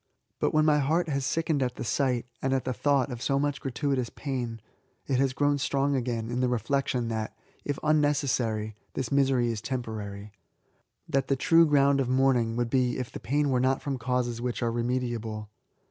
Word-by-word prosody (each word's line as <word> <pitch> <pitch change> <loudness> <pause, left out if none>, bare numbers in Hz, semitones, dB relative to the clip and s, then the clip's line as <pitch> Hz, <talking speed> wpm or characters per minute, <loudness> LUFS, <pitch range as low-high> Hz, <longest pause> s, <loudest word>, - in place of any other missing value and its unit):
But - - +1
when 155 0 +3
my 150 -1 +4
heart 160 +5 +1
has 140 -2 -1
sickened 160 -3 0
at 125 -1 -1
the - - -5
sight, 125 0 0 0.2
and 135 0 +1
at 130 - 0
the 130 - -1
thought 140 -1 +1
of 120 -1 -6
so 135 +2 +1
much 145 -1 -1
gratuitous 135 -1 -1
pain, 125 -5 -4 0.5
it 130 -2 0
has 135 -1 +2
grown 145 +2 +1
strong 140 +1 +1
again 120 -3 -2
in 125 - -1
the 130 - +2
reflection 125 +1 0
that, 110 -1 -3 0.3
if 145 -1 -2
unnecessary, 135 -8 +1 0.2
this 130 -4 -3
misery 135 -4 +3
is 110 -2 -4
temporary, 110 -4 -5 0.4
— - - -45
that 135 -1 0
the 135 - +2
true 165 +5 +5
ground 140 -1 +4
of 130 -2 0
mourning 130 -3 +2
would 120 -1 -1
be 125 -2 +2
if 125 -2 -4
the - - -7
pain 145 +2 0
were 125 - +2
not 130 +1 +2
from 135 -3 -2
causes 120 -1 -1
which 125 0 -2
are 115 - +1
remediable. 115 -3 -2
130 Hz, 195 wpm, -28 LUFS, 120-140 Hz, 0.5 s, true